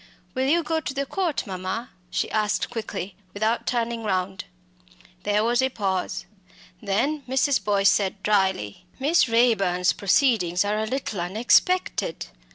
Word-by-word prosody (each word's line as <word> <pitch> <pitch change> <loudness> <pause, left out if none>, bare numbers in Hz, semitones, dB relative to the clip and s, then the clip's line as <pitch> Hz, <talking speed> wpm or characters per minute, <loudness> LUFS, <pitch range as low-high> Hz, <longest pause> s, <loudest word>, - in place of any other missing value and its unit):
"Will 260 0 0
you 335 +4 +3
go 320 +1 0
to 275 -3 -5
the 280 0 -1
Court, 345 -2 -1
mamma?" 190 +5 -4 0.2
she 185 - -2
asked 215 +1 0
quickly, 215 -5 -5 0.2
without 220 +3 0
turning 235 -1 -1
round. 190 -1 -2 0.8
There 210 +2 +1
was 240 +2 +2
a 260 - +2
pause. 195 -6 -2 0.6
Then 250 +10 0
Mrs. 265 -3 +2
Boyce 200 -1 +3
said 195 -1 -1
drily 190 - 0
"Miss 290 0 +3
Raeburn's 195 -7 +3
proceedings 200 -4 +2
are 210 +1 0
a 220 - -1
little 235 -7 -3
unexpected. 230 - +1
215 Hz, 140 wpm, -24 LUFS, 190-260 Hz, 0.8 s, you